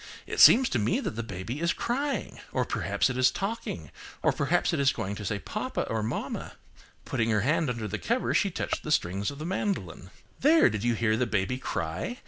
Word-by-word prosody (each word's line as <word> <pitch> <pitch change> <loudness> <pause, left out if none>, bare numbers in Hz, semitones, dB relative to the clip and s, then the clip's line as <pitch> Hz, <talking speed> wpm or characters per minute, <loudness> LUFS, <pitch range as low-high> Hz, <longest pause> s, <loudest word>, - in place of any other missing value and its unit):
It - - -4
seems 255 +1 +8
to 120 - 0
me 105 +2 +1
that - - -3
the 115 - -4
baby 110 +4 -5
is 170 +1 +2
crying. 270 +4 -2
Or, - - 0
perhaps - - 0
it 130 - -3
is 130 0 +6
talking, 175 - -4 0.3
or - - +4
perhaps - - +1
it - - 0
is 135 -2 +4
going 100 -3 -4
to 105 - -7
say 105 +2 -1
papa 95 - -3
or 110 -1 0
mamma." 110 +3 -4 0.5
Putting 115 -3 0
her 105 -2 +2
hand 150 +4 +1
under 115 -3 -3
the 105 +1 -4
cover, 240 +2 0
she 200 - +3
touched - - -3
the 155 - -5
strings 100 -6 +1
of 140 - -8
the 155 - -6
mandolin. 175 - -3 0.3
"There! 305 - +5
did 105 -1 -3
you 120 -1 +2
hear 110 0 +2
the 125 +1 +1
baby 110 +4 -1
cry? 85 - -3
120 Hz, 215 wpm, -28 LUFS, 105-170 Hz, 0.5 s, seems